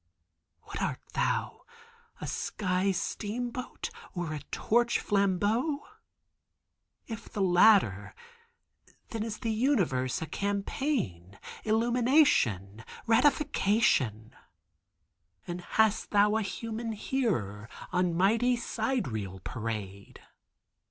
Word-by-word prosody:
"What - - -7
art - - -1
thou—a 465 0 -4
sky 185 -1 -1
steamboat, 235 +6 -4 0.2
or 175 -3 -3
a 150 - -4
torch 235 +1 +2
flambeau? 205 - +1 1.2
If 225 -1 -8
the 200 - -1
latter, 175 - +4 0.9
then 225 - -4
is 220 -1 -3
the 230 -3 -1
universe 190 - +1
a 160 - -3
campaign, 200 - -2 0.3
illumination, 225 - +2 0.2
ratification? 220 - +2 1.1
And 175 0 -5
hast 220 +3 +1
thou 210 +1 +4
a 220 - +2
human 225 +2 -4
hearer 150 - -2 0.2
on 180 -2 +1
mighty 225 +7 +3
sidereal 175 - -2
parade?" 105 -3 -6
205 Hz, 85 wpm, -29 LUFS, 150-235 Hz, 1.2 s, latter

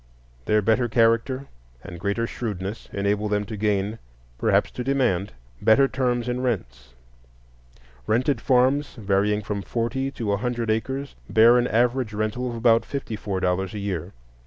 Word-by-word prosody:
Their 105 0 +2
better 115 +3 +2
character 115 +4 +2 0.4
and 85 - -9
greater 100 +5 -1
shrewdness 105 -3 -5
enable 100 +1 0
them 105 0 0
to 110 +2 -6
gain, 105 +1 -1 0.4
perhaps - - +2
to 125 - -5
demand, 120 -8 0 0.3
better 135 +5 +5
terms 125 -2 -1
in 125 +1 -1
rents; 60 - -4 1.1
rented 125 +2 +1
farms, 130 +2 +2
varying 105 -1 +1
from 100 0 -3
forty 120 +6 -2
to 115 -6 -3
a 100 - +1
hundred 120 0 -1
acres, 135 +5 -2 0.2
bear 115 +2 +6
an 120 - +1
average 120 0 +1
rental 110 +4 -2
of 120 - -5
about 115 0 +4
fifty 135 -5 -5
four 100 -3 -3
dollars 95 +2 -1
a - - -3
year. 95 -3 -3
110 Hz, 155 wpm, -24 LUFS, 100-125 Hz, 1.1 s, bear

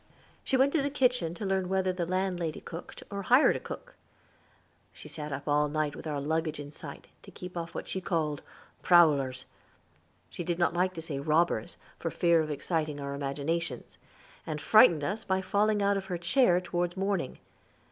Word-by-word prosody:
She 265 - +1
went 270 +2 +3
to 320 - +3
the 280 - 0
kitchen 250 - +1
to 205 - -5
learn 190 -1 0
whether 190 -1 +1
the 175 -2 -3
landlady 180 -3 -1
cooked, 165 +1 -9
or 200 0 -3
hired 250 +8 +5
a - - -2
cook. - - -9 1.0
She - - -11
sat 150 -1 -6
up 140 +1 -5
all 150 0 +2
night 150 -1 -1
with - - -8
our 150 -2 -2
luggage 155 +1 -1
in 145 0 -7
sight, - - -9 0.2
to - - -13
keep 180 0 -9
off 170 -1 -5
what - - -5
she 190 - -3
called 155 -5 -1 0.4
"prowlers" 140 -7 +4 0.8
she 175 - -6
did 170 0 -1
not 170 -1 +2
like 185 +1 +1
to 165 - -6
say 145 -4 -4
robbers, 155 -4 +1 0.2
for - - -2
fear 170 -2 +3
of 155 - -3
exciting 155 0 -2
our 140 0 -4
imaginations 140 +1 -3 0.5
and 155 -2 -3
frightened 175 -4 +6
us 205 +8 -2
by 190 0 0
falling 205 +2 +1
out 200 0 +3
of 195 - -4
her 180 -2 -3
chair 175 +1 +3
toward 175 0 -2
morning. 195 -7 -1
170 Hz, 190 wpm, -29 LUFS, 150-190 Hz, 1.0 s, frightened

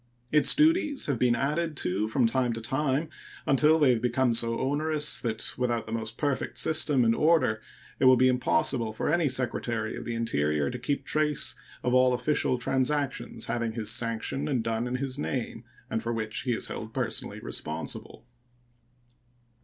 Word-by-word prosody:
Its 150 -1 +5
duties 310 -2 +3
have 140 -5 -1
been 125 -1 +3
added 150 +5 -1
to 100 +1 -1
from 120 +3 +1
time 125 +1 +1
to 115 - -4
time 135 +5 -1 0.4
until 150 +4 +4
they 145 -5 +4
have 115 -3 0
become 125 0 +1
so 115 0 +1
onerous 150 +2 +1
that 110 -2 -2
without 120 -2 -1
the 110 - -9
most 115 0 -4
perfect 145 -3 -2
system 150 -5 +3
and 115 - +4
order 150 -8 +2 0.4
it 130 - +2
will 130 0 +8
be 130 +1 +4
impossible 125 -2 +1
for 110 +7 -2
any 170 -4 +2
Secretary 120 -3 -1
of - - -7
the 115 0 -4
Interior 75 -10 0
to 125 - -6
keep 140 +4 -2
trace 150 -1 +1 0.3
of 125 - 0
all 130 0 +4
official 125 0 0
transactions 130 0 -1
having 115 -2 -2
his 110 -2 -1
sanction 115 +4 0
and 130 -6 0
done 115 +1 -2
in 125 - -3
his 135 +1 -3
name, 125 -4 -4 0.2
and 110 - -2
for 115 +1 -3
which 110 -1 -2
he 125 - +1
is - - -1
held - - -7
personally - - -2
responsible. 80 +8 -6
125 Hz, 175 wpm, -27 LUFS, 115-145 Hz, 0.4 s, will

